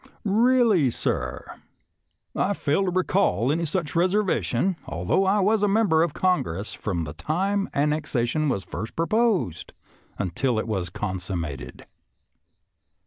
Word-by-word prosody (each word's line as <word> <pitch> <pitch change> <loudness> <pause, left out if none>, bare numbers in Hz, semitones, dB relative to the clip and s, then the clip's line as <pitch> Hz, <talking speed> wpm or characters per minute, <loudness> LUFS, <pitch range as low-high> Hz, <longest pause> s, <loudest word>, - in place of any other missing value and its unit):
" - - -34
Really, 220 - +4
sir, - - -3 0.8
I 200 - +1
fail 190 +1 0
to - - +1
recall 175 - +1
any 165 +2 0
such 160 0 -3
reservation, 185 +1 +1
although 85 - 0
I 200 +2 +3
was 210 +2 +2
a 205 - +3
member 200 -6 +3
of 165 -3 0
Congress 105 - 0
from 90 -6 -3
the 75 -2 -6
time 195 - -1
annexation 150 -1 0
was 100 -7 -1
first 105 +5 -6
proposed 180 - 0 0.4
until 110 +6 -1
it 110 - -2
was 95 -5 -2
consummated." 90 -6 -5
155 Hz, 130 wpm, -25 LUFS, -, 0.8 s, Really